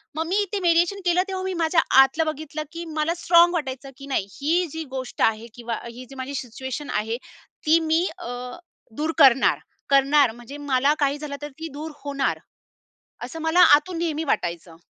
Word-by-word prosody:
मग 320 +1 -2
मी 370 - -1
इथे 405 0 -3
मीडिएशन 345 +4 +3
केलं, 355 +1 +3
तेव्हा 380 -1 -4
मी 380 - -2
माझ्या 320 0 +3 0.2
आतलं 315 +4 +2
बघितलं 310 0 -4
की 335 +1 -7
मला 310 +2 +1
स्ट्राँग 345 +1 +6
वाटायचं, 270 -4 -4
की 275 - -10
नाही 235 -8 -1
ही 335 +5 +1
जी 320 0 -5
गोष्ट 260 -1 -6
आहे 225 +1 +1
किंवा 235 -1 -4
ही 240 +2 -10
जी 270 - -11
माझी 260 +1 -6
सिच्युएशन 260 +4 -6
आहे, 220 +2 -1 0.5
ती 320 +2 +5
मी 325 +2 +1
अ, 345 -8 -6 0.7
दूर 310 +2 0
करणार. 270 -4 +5 0.3
करणार 275 -2 +4
म्हणजे 240 +5 -11
मला 280 0 +2
काही 285 0 +1
झालं, 290 -1 -6
तर 295 - -5
ती 325 - -5
दूर 310 +2 -6
होणार. 280 -1 -1 0.9
असं 325 - -7
मला 320 +2 +2 0.2
आतून 330 +4 -2
नेहमी 320 -2 -1
वाटायचं. 170 - -2
295 Hz, 180 wpm, -23 LUFS, 265-330 Hz, 0.9 s, स्ट्राँग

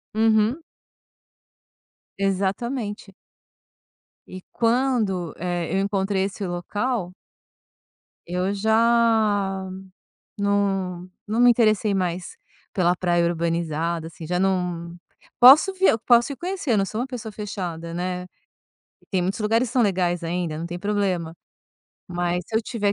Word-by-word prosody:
Uhum. 220 +6 +2 1.6
Exatamente. 200 +2 -2 1.1
E 185 - -9
quando, 230 -7 +1
eh, 175 -1 -3
eu - - +2
encontrei 195 -1 0
esse 195 0 -4
local 180 +3 -2 1.1
eu 180 +3 -1
já 220 -3 +2 0.7
não 195 -3 -1 0.2
não 220 +3 -1
me 245 0 +7
interessei 215 -3 +3
mais 180 - -2 0.4
pela 180 -3 +2
praia 175 -1 +1
urbanizada, 165 -1 -1
assim, 165 0 -10
já 180 +2 -1
não 180 -3 -1 0.5
posso 280 +10 +8
vi 380 0 +2
eu 225 - +4
posso 240 +3 +3
ir - - -7
conhecer, 355 -6 -2
eu 215 - +3
não 195 - +2
sou 215 +3 -4
uma 250 - -1
pessoa 235 -4 -7
fechada, 180 -6 -5
né, 180 +1 -3 0.8
e - - -28
tem 190 - +1
muitos 190 +5 -2
lugares 225 +3 +1
que - - -9
são 250 - +3
legais 180 -4 0
ainda, 170 -1 -2
não 165 - -4
tem 175 +1 -6
problema, 190 -5 -1 0.7
mas 175 0 -1
se 220 - -2
eu 225 - +1
tiver 210 -3 -1
195 Hz, 130 wpm, -23 LUFS, 175-225 Hz, 1.6 s, posso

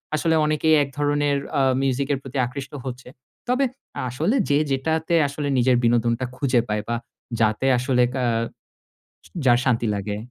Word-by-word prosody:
আসলে 160 +2 +1
অনেকেই 155 +1 +3
এক 140 - -6
ধরনের 145 -1 +1 0.2
আ - - +3 0.2
মিউজিকের 135 +1 0
প্রতি 135 0 -7
আকৃষ্ট 130 +2 -7
হচ্ছে। 125 -1 -7 0.4
তবে 255 +2 +2 0.4
আসলে 155 - 0
যে 145 - +4
যেটাতে 160 +5 -1
আসলে 145 +1 -4
নিজের 125 0 +3
বিনোদনটা 120 +1 +2
খুঁজে 130 -2 +2
পায় 105 0 -2
বা 120 - -1 0.4
যাতে 110 +3 +1
আসলে 125 0 +2
কা 130 -1 -1 1.0
য - - -15 0.2
যার 120 -2 +6
শান্তি 120 -3 +1
লাগে। 105 +1 -3
135 Hz, 150 wpm, -23 LUFS, 120-145 Hz, 1.0 s, যার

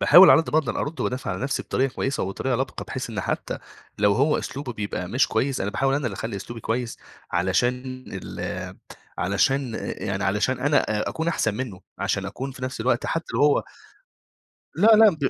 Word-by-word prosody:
باحاول 185 +2 +9
على 160 - +8
قد - - -7
ما 155 - +4
أقدَر 155 - -1
أرد 150 +3 -3
وأدافع 125 -5 -2
على 90 - -4
نَفْسي 135 - -1
بطريقة 135 0 0
كويسة 135 +1 -1
وبطريقة 125 +7 -1
لبقة، 130 +2 -3
بحيث 130 -3 -5
إن 105 -3 -2
حتى - - -3 0.4
لو 105 -1 +4
هو 140 +7 +3
أسلوبه 135 -3 -5
بيبقى 100 -4 -4
مش 125 +4 +2
كويس، 130 +4 0
أنا 100 - -1
باحاول 135 +5 +1
أنا 145 -3 0
اللي 105 - -3
أخلّي 105 +2 -4
أسلوبي 115 +4 -7
كويس 115 +1 -2 0.3
علشان 125 +8 0
ال - - -5 0.4
علشان 115 +7 +1 0.2
يعني 100 -1 -2
علشان 105 +6 +1
أنا 145 +2 +4 0.2
آآ، - - -1
أكون 160 +1 -2
أحسن 110 -10 +1
منه، 110 -7 -5 0.2
عشان 95 0 -1
أكون 130 +7 -5
في 130 -1 -11
نَفْس 130 -3 -4
الوقت 120 +1 +1
حتى 165 0 -1
لو - - +1
هو 145 -1 +4 1.1
لا، 215 - +4
لا، 220 -1 +8
ب 135 - +2
125 Hz, 195 wpm, -24 LUFS, 105-135 Hz, 1.1 s, باحاول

